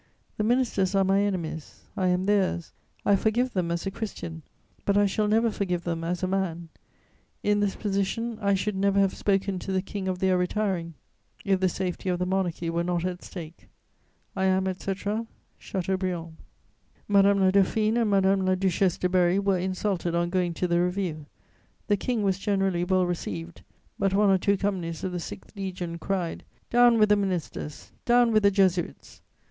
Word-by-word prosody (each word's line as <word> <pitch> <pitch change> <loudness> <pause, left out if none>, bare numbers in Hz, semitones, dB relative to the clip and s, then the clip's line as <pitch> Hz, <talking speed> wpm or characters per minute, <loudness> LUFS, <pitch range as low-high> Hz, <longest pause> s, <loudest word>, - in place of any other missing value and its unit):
The 210 - 0
ministers 220 -5 +1
are 195 - +4
my 195 +1 +3
enemies; 170 -6 -3
I 185 - 0
am 180 +1 +1
theirs; 195 -5 +1 0.3
I 200 - +5
forgive 235 +5 +1
them 180 -3 0
as 170 +2 -2
a 195 - -2
Christian; 170 -6 -6 0.4
but 200 0 +2
I 205 - +5
shall 210 +2 0
never 225 +2 +3
forgive 180 -4 -2
them 165 -1 -3
as 175 +2 -2
a - - +2
man; 175 -3 -2 0.7
in 205 0 +2
this 205 -1 0
position, 210 +3 -2
I 200 -1 +3
should 195 +2 -1
never 200 +1 +1
have 195 -1 +3
spoken 195 -1 0
to 195 - -5
the 190 -1 0
King 195 -1 -5
of 185 -1 -1
their 185 0 +2
retiring, 180 -3 -1 0.5
if 195 -2 +2
the 185 0 +2
safety 185 +1 -3
of 180 - +1
the 180 - -1
Monarchy 180 -3 -1
were 170 +1 0
not 175 0 -1
at 180 -1 -4
stake. 165 -3 -10 0.7
"I 190 -1 0
am, 190 0 +2
etc., 200 +4 -3 0.3
"CHATEAUBRIAND." 185 -3 -3 0.7
Madame 200 0 +4
la 190 -1 +4
Dauphine 215 +3 +2
and 230 -3 +2
Madame 195 -1 +3
la 185 0 +2
Duchesse 185 -1 +1
de 180 - 0
Berry 180 0 +3
were 195 -2 +1
insulted 185 -1 -1
on 175 0 0
going 180 -2 0
to 180 - -1
the 170 0 +2
review; 180 -4 -2 0.6
the 205 - +2
King 225 +1 -1
was 195 -1 +1
generally 195 -3 0
well 185 0 +2
received; 95 - -5 0.4
but 195 -1 +1
one 205 -1 +4
or 190 - +4
two 200 +2 +2
companies 180 -5 -2
of 185 - -2
the 180 - -3
6th 185 - -9
Legion 180 -4 -5
cried: 180 -2 -2 0.3
"Down 240 -1 +6
with 215 -1 +4
the 210 - +6
ministers! 180 -6 -4
Down 240 -1 +4
with 215 -1 +4
the 200 - +5
Jesuits!" 190 -3 0
190 Hz, 185 wpm, -26 LUFS, 180-200 Hz, 0.7 s, Down